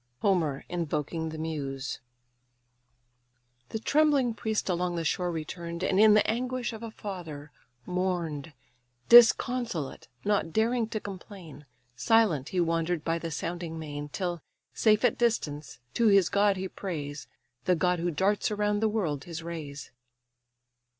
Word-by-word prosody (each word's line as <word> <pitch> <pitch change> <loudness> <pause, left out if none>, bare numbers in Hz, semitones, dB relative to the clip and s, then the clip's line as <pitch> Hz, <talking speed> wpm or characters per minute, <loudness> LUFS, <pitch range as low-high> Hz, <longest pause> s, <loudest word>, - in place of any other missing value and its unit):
HOMER 165 -8 +1
INVOKING 160 -1 -2
THE 160 - -7
MUSE 140 -4 -4 1.7
The - - -3
trembling 280 0 +3
priest 220 -1 -2
along 180 -1 0
the 165 -1 -2
shore 180 +2 0
return'd, 170 +2 -5
And 190 0 +2
in 215 0 +7
the 210 - +4
anguish 245 +1 -1
of 220 - -8
a 230 - -5
father 165 -9 -7 0.3
mourn'd. 175 -5 -2 0.6
Disconsolate, 240 - +5 0.2
not 200 -5 +1
daring 225 +3 +1
to 220 - -2
complain, 185 -7 -10 0.3
Silent 165 - +3
he 185 - -1
wander'd 165 -1 0
by 165 0 0
the 165 - -4
sounding 165 +1 -4
main; 145 -2 -6
Till, 175 0 -3 0.3
safe 215 +1 +3
at - - +2
distance, 155 - -1 0.2
to 235 - +3
his 200 -4 +5
god 200 -1 +3
he 190 +1 -3
prays, 150 -7 -6 0.4
The 180 - +4
god 180 +1 +1
who 175 +1 0
darts 190 +8 +1
around 210 0 0
the 220 0 +2
world 165 -10 -2
his 165 -2 -6
rays. 150 -6 -7
180 Hz, 140 wpm, -28 LUFS, 160-210 Hz, 1.7 s, in